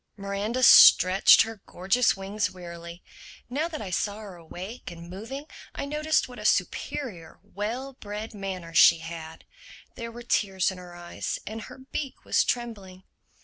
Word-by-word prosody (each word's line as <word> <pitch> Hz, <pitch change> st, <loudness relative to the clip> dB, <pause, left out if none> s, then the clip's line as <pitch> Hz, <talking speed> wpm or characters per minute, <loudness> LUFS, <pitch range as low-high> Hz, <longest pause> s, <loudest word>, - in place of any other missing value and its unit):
Miranda 200 Hz, +5 st, -3 dB
stretched 185 Hz, -4 st, +8 dB
her 225 Hz, -3 st, -8 dB
gorgeous 195 Hz, +6 st, +1 dB
wings 200 Hz, +2 st, -2 dB
wearily. 170 Hz, -1 st, -10 dB, 0.5 s
Now 300 Hz, +6 st, 0 dB
that 315 Hz, -6 st, -6 dB
I 190 Hz, -, -6 dB
saw 205 Hz, +3 st, -1 dB
her 205 Hz, -4 st, -10 dB
awake 180 Hz, +7 st, -9 dB
and 170 Hz, 0 st, -11 dB
moving 230 Hz, +10 st, -7 dB, 0.3 s
I -, -, -3 dB
noticed 305 Hz, +2 st, 0 dB
what 250 Hz, -1 st, -11 dB
a -, -, -8 dB
superior, 195 Hz, -, -2 dB
well 240 Hz, +7 st, -5 dB
bred 210 Hz, -2 st, -7 dB
manner 190 Hz, -4 st, -6 dB
she 165 Hz, -, +7 dB
had. 165 Hz, -1 st, -9 dB, 0.5 s
There 230 Hz, -1 st, -7 dB
were 240 Hz, +1 st, -10 dB
tears 195 Hz, -5 st, +1 dB
in 185 Hz, -, -9 dB
her 175 Hz, -1 st, -11 dB
eyes 175 Hz, 0 st, -5 dB
and 220 Hz, +1 st, -6 dB
her -, -, -11 dB
beak 265 Hz, +1 st, -6 dB
was -, -, +3 dB
trembling. 200 Hz, -6 st, -4 dB
200 Hz, 155 wpm, -26 LUFS, 180-240 Hz, 0.5 s, stretched